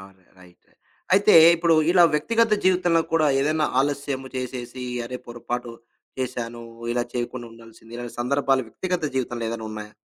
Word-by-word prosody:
అవును. 95 -1 -16 0.2
రైట్. 90 -1 -20
రె - - -31 0.4
అయితే, 200 +2 +5 0.2
ఇప్పుడు 165 0 +3 0.2
ఇలా 180 0 +6
వ్యక్తిగత 230 +8 +2
జీవితంలో 180 -2 +3
కూడా 160 -2 +3
ఏదైనా 155 +2 +1 0.2
ఆలస్యము 140 -1 -2
చేసేసి, 125 0 -5 0.2
అరే 125 +2 -5
పొరపాటు 120 0 -5 0.5
చేశాను. 120 -2 -4 0.3
ఇలా 120 0 0
చేయకుండా 120 0 -4
ఉండాల్సింది. 115 0 -16
ఇలాంటి 120 -1 -7
సందర్భాలు 135 +1 +1
వ్యక్తిగత 180 +4 -3
జీవితంలో 120 -2 -2
ఏదైనా 115 -1 -5
ఉన్నాయా? 105 -1 -8
125 Hz, 145 wpm, -24 LUFS, 120-155 Hz, 0.5 s, ఇలా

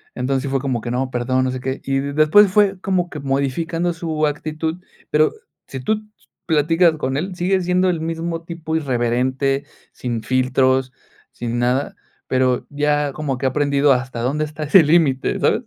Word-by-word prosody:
Entonces, 130 +1 -1
sí 140 - -3
fue 135 0 0
como 130 -4 -2
que 120 - -5
no, 130 +1 -1
perdón, 130 +1 0
no 130 - -1
sé 130 - -4
qué. 130 +1 -4
Y 135 0 0
y - - +1
después 155 +7 +5
fue 195 -1 +3
como 180 -2 -1
que 150 - -7
modificando 160 +6 -1
su 160 -2 -1
actitud, 155 +2 -3 0.3
pero 155 +1 +3 0.4
si 135 - -6
tú 215 +12 0
ts 215 0 -27 0.2
platicas 165 +2 +3
con 130 -2 -2
él, 180 +4 -3
sigue 185 +2 +1
siendo 180 +1 +2
el 170 -3 -1
mismo 165 +1 -3
tipo 165 -1 -5
irreverente, 130 0 0 0.3
sin 120 -3 -4
filtros, 130 0 +1 0.4
sin 120 0 -4
nada, 125 +3 0 0.3
pero 130 -1 +1
ya 145 -1 0
como 140 -4 -3
que 135 - -4
ha - - +4
aprendido 140 0 +3
hasta 125 -1 -3
dónde 150 +5 0
está 155 +1 -7
ese 160 +5 +6
límite, 150 -4 +2
¿sabes? - - +2
145 Hz, 185 wpm, -20 LUFS, 130-165 Hz, 0.4 s, ese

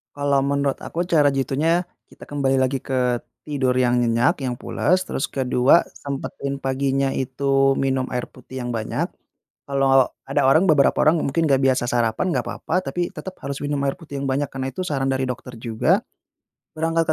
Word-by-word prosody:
Kalau 140 -1 +1
menurut 140 -1 0
aku 170 - -3
cara 165 -5 +3
jitunya, 150 +6 +1 0.2
kita - - -20
kembali 140 -2 0
lagi 130 +1 0
ke 130 -2 0 0.4
tidur 130 -4 0
yang 125 -1 +3
nyenyak, 120 +3 +2
yang 125 -2 -2
pulas, 185 +3 0
terus 135 - -3
ke-2 130 +4 +3
sempetin 140 0 -5
paginya 135 0 0
itu 135 +1 +1
minum 135 -1 0
air 125 -1 -2
putih 130 +1 -12
yang 120 - -3
banyak. 110 -1 -2 0.6
Kalau 135 -2 +3 0.2
ada - - +1
orang 160 +8 +5
beberapa 145 -4 +5
orang 155 +1 +4
mungkin 160 +3 +1
nggak 135 -1 +3
biasa 130 -2 +2
sarapan, 120 +9 0
enggak - - +1
apa-apa, 185 +2 -2
tapi 175 -1 -1
tetap 190 -1 -9
harus 140 +1 -5
minum 145 0 -1
air 135 - -1
putih 150 -5 -8
yang 135 - -2
banyak, 135 +1 -1
karena 135 -1 -3
itu 185 +7 -4
saran 135 -5 -1
dari 130 0 0
dokter 125 -1 -5
juga, 115 -1 +1 0.7
berangkat 165 0 +1
135 Hz, 175 wpm, -22 LUFS, 130-145 Hz, 0.7 s, orang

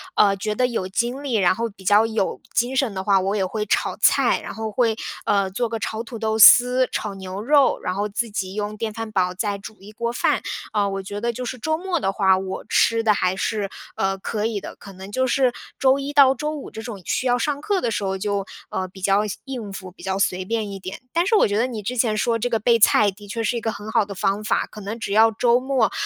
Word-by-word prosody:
呃 200 -1 +4
觉 210 +1 -2
得 250 +1 +2
有 210 -6 -3
精 240 +7 -2
力， 275 -4 -4
然 185 -3 +4
后 230 +3 -2
比 195 -1 -17
较 205 +3 +5
有 220 -3 -1
精 250 +3 0
神 255 -7 +1
的 190 0 -4
话， 195 -1 +4
我 195 +2 -1
也 190 -2 +1
会 210 +3 -3
炒 - - 0
菜， - - +3
然 - - -7
后 220 -1 -4
会 225 -1 +1 0.3
呃 195 -2 +1
做 235 +5 -1
个 225 0 -4
炒 220 +2 -3
土 230 0 -8
豆 220 0 -1
丝， 250 +3 +8
炒 210 -2 -3
牛 190 +1 -6
肉， 280 +3 +4
然 180 - -1
后 205 +2 -1
自 225 +3 -3
己 190 -2 -3
用 210 0 -4
电 220 -1 -3
饭 225 -1 -6
煲 180 -2 +1
再 200 +1 -2
煮 210 +2 -10
一 205 +2 -12
锅 235 +2 -3
饭。 - - +1 0.3
啊 205 -1 +1
我 195 0 -4
觉 205 +2 -6
得 235 +1 -1
就 250 - -5
是 255 +1 -5
周 315 +4 -1
末 360 -1 -2
的 195 - -1
话， 190 -2 +3
我 190 0 -5
吃 230 0 +3
得 215 - +4
还 185 -2 0
是 205 0 -2 0.3
呃 195 0 0
可 210 +2 -3
以 220 -3 -1
的， - - -8
可 200 -1 -12
能 190 +2 -10
就 260 +4 +1
是 255 -1 +2 0.3
周 265 +1 +4
一 280 +1 -4
到 270 -2 +6
周 300 +4 -3
五 300 -3 -7
这 220 - -8
种 220 -5 -7
需 - - -1
要 245 -1 +3
上 285 +3 -1
课 400 -1 0
的 - - 0
时 205 - -2
候， 190 0 -1
就 200 0 -2 0.2
呃 185 - -3
比 190 +1 -14
较 195 +2 +2
下 205 - -5
应 240 -7 -6
付， 185 -1 -8
比 - - -16
较 190 0 -2
随 185 -1 0
便 220 -1 -2
一 195 - -6
点。 185 +1 -8
但 340 +1 +2
是 435 +3 +2
我 - - +5
觉 205 +1 -1
得 230 - +2
你 225 -4 -5
之 245 +5 -4
前 225 -2 +2
说 230 +1 +1
这 245 +2 -2
个 225 -2 0
备 230 +2 +3
菜， 210 0 +5
的 205 +2 -14
确 225 +3 -3
是 235 +2 0
一 - - -4
个 225 - -1
很 210 +1 -8
好 210 - +3
的 200 - -7
方 200 +2 -1
法， 215 - 0
可 210 - -11
能 215 +4 -5
只 200 - -4
要 225 +1 +6
周 240 +2 +3
末， 260 -3 +1
215 Hz, 290 characters per minute, -22 LUFS, 195-240 Hz, 0.3 s, 丝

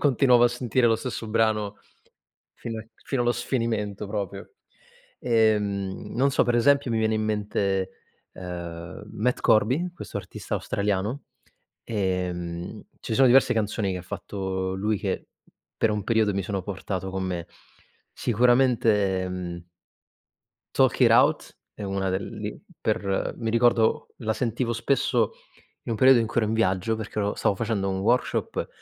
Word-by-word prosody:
continuavo 130 -3 +4
a - - +6
sentire 120 0 +1
lo 115 - +3
stesso 115 -1 -5
brano 105 -2 +1 0.8
fino 115 -1 -6 0.2
fino 135 -3 -1
allo 120 - +3
sfinimento 115 -5 -2
proprio. 100 -2 -5 0.7
E, 110 -3 +3
mhmm, 100 -2 -4
non 135 +3 +3
so, - - +3
per 120 0 +1
esempio 140 +1 +3
mi 115 - +1
viene 110 0 +1
in 110 - 0
mente, 100 -3 0 0.4
ehm, 85 -2 -7
Matt 125 +4 0
Corby, 130 +12 +3
questo - - -6
artista - - -7
australiano, 105 +6 -1 0.6
ehm, 90 -4 -3 0.2
ci 110 - -3
sono 135 +2 +6
diverse 130 +2 +5
canzoni 105 -2 -1
che - - -3
ha - - -7
fatto 95 0 -4
lui 105 +2 0
che - - -3 0.6
per 110 - +4
un 105 -1 -2
periodo 110 -3 +2
mi 100 0 -1
sono 100 -1 -2
portato 95 -1 -4
con 95 0 -3
me. 90 -2 -3 0.7
Sicuramente, 115 -6 +2
mhmm 85 -2 -5 1.1
Talk - - +3
it - - +6
out - - +3 0.2
è 105 - -8
una 95 -1 -1
del 95 +1 -1
li - - -5 0.2
per 95 -1 -1
mi 115 -2 -2
ricordo, 115 -1 +3
la 110 -2 -1
sentivo 120 0 -1
spesso 115 -2 +1 0.5
in - - -4
un - - 0
periodo 130 +1 +7
in 115 - 0
cui 115 - -5
ero 110 - +1
in - - 0
viaggio 110 0 +1
perché 110 -1 -5
ero 100 0 0
stavo 100 - +1
facendo 105 -3 -1
un 95 0 -2
workshop 120 +6 0
110 Hz, 155 wpm, -25 LUFS, 95-120 Hz, 1.1 s, periodo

